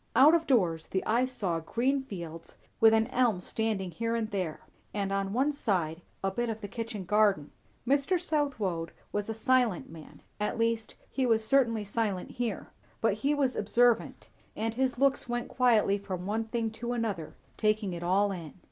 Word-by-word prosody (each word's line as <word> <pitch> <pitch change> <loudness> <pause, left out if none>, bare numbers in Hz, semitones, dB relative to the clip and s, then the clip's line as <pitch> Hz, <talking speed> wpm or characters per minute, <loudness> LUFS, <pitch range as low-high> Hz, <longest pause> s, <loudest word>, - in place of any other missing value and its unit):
Out 295 +4 +8
of 330 -1 +2
doors, 175 - +2
the 190 - -2
eye 240 +3 +3
saw 195 -10 -2
green 250 +11 0
fields, 170 -9 -8 0.2
with 225 0 +7
an 220 0 +4
elm 240 -7 +2
standing 195 -1 -2
here 230 +4 -2
and 225 -1 -2
there; 185 -6 -3 0.3
and 200 -1 -1
on 195 0 -1
one 270 +7 +1
side, 175 - -1 0.2
a 195 - +1
bit 240 +4 -1
of 220 -1 -3
the 205 - -5
kitchen 225 -2 -5
garden. 205 -7 +2 0.4
Mr. 280 +7 +2
Southwode 230 - -1 0.2
was 205 +1 -2
a 225 - -2
silent 245 - +1
man, 160 -2 -13 0.2
at 210 +3 -1
least 230 -1 0 0.2
he 265 -2 0
was 220 -2 +2
certainly 230 -4 +2
silent 200 -3 -2
here; 240 -2 -3 0.3
but - - +2
he 285 +2 0
was 270 -3 +1
observant; 235 +3 +2 0.3
and 225 +1 -2
his 255 +1 0
looks 275 -1 +2
went 240 0 -2
quietly 225 -5 +3
from 185 -3 -5
one 220 +3 -1
thing 225 0 -2
to 235 +2 -4
another, 210 -9 -3 0.2
taking 215 -3 +1
it 170 - -5
all 195 +4 +2
in. 170 -6 -7
220 Hz, 180 wpm, -30 LUFS, 195-245 Hz, 0.4 s, Out